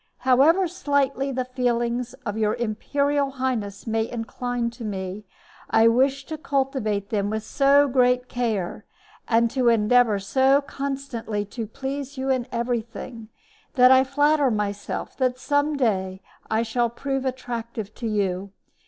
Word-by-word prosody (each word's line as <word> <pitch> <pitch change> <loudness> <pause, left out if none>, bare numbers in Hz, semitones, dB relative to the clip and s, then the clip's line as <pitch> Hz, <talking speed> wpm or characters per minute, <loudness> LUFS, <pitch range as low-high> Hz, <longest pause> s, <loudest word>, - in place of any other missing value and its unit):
However 295 +9 +4
slightly 285 -5 0
the 255 -1 -2
feelings 245 -1 -1
of 205 -2 -2
your 215 -1 +1
imperial 280 +5 0
highness 255 -7 -3
may 225 -1 -1
incline 240 +1 -3
to 235 0 -10
me, 195 -1 -5 0.4
I 225 +1 +5
wish 270 +3 +2
to 315 -1 -6
cultivate 265 - -1
them 205 -2 0
with 220 0 -2
so 280 +3 +4
great 250 -1 +2
care, 225 -8 -2 0.4
and 230 0 +3
to 255 -3 +2
endeavor 230 0 +4
so 265 +8 +3
constantly 270 -7 -4
to 230 -3 -4
please 275 +4 -5
you 265 +1 -1
in 255 -2 0
everything, 235 -1 -4 0.5
that 250 -1 +7
I 260 0 +7
flatter 290 +1 +2
myself 205 -2 -3
that 255 -2 +1
some 285 +2 0
day 190 -6 -1 0.3
I 220 +1 +1
shall 235 +1 0
prove 270 +3 -3
attractive 235 -5 -4
to 235 - -5
you. 200 -2 -1
245 Hz, 140 wpm, -24 LUFS, 220-270 Hz, 0.5 s, that